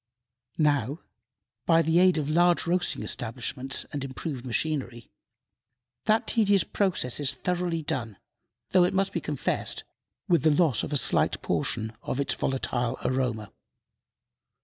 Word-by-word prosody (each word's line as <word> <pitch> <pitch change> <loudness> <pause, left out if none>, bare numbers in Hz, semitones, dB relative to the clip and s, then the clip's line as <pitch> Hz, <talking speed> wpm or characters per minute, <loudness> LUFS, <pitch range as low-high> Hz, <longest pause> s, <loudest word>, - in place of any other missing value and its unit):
Now, 145 -1 +1 0.7
by 165 -1 +5
the 160 +2 +3
aid 185 -1 +5
of 150 -2 -1
large 175 +3 +3
roasting 175 +1 0
establishments 125 +3 -2
and 145 -2 -3
improved 130 -1 -5
machinery, 125 -3 -2 0.9
that 215 +1 +2
tedious 205 -5 +3
process 180 - 0
is 140 -1 +1
thoroughly 175 +2 -2
done, 115 -8 -3 0.5
though, 185 -1 +5
it 180 +2 +1
must 195 0 +1
be - - -2
confessed, - - -2 0.4
with 175 -4 +3
the 160 - +4
loss 150 -5 +3
of - - -5
a 145 - +3
slight - - +1
portion 110 0 -1
of 130 - -3
its 140 - +1
volatile 125 -2 -2
aroma. 125 -5 -1
145 Hz, 135 wpm, -27 LUFS, 125-175 Hz, 0.9 s, by